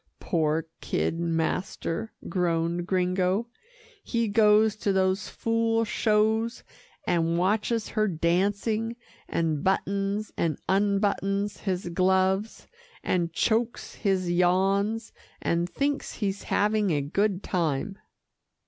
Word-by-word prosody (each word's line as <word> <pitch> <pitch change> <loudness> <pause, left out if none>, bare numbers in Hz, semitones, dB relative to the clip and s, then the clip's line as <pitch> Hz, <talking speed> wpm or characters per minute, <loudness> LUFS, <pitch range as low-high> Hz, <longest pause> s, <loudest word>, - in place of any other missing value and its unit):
"Poor 160 -1 0
kid 165 - -1
master," 170 +4 -2 0.2
groaned 170 -1 0
Gringo, 185 +3 +1 0.6
"he 235 -2 0
goes 210 0 +4
to 205 - 0
those 190 +1 +1
fool 230 0 +1
shows, 220 +2 +1 0.4
and 170 -1 +1
watches 210 +4 0
her 215 -1 +1
dancing, 200 +6 0 0.3
and 160 -3 0
buttons 200 +2 0
and 160 -4 0
unbuttons 200 0 +1
his 185 -3 -2
gloves, 190 +4 +1 0.4
and 170 -2 0
chokes 225 +7 0
his 190 -4 0
yawns, 195 +5 +1 0.3
and 170 +1 0
thinks 280 +8 -1
he's 200 -2 -2
having 210 0 +2
a 150 -4 +1
good 195 +6 0
time." 170 +2 -1
195 Hz, 105 wpm, -27 LUFS, 175-215 Hz, 0.6 s, goes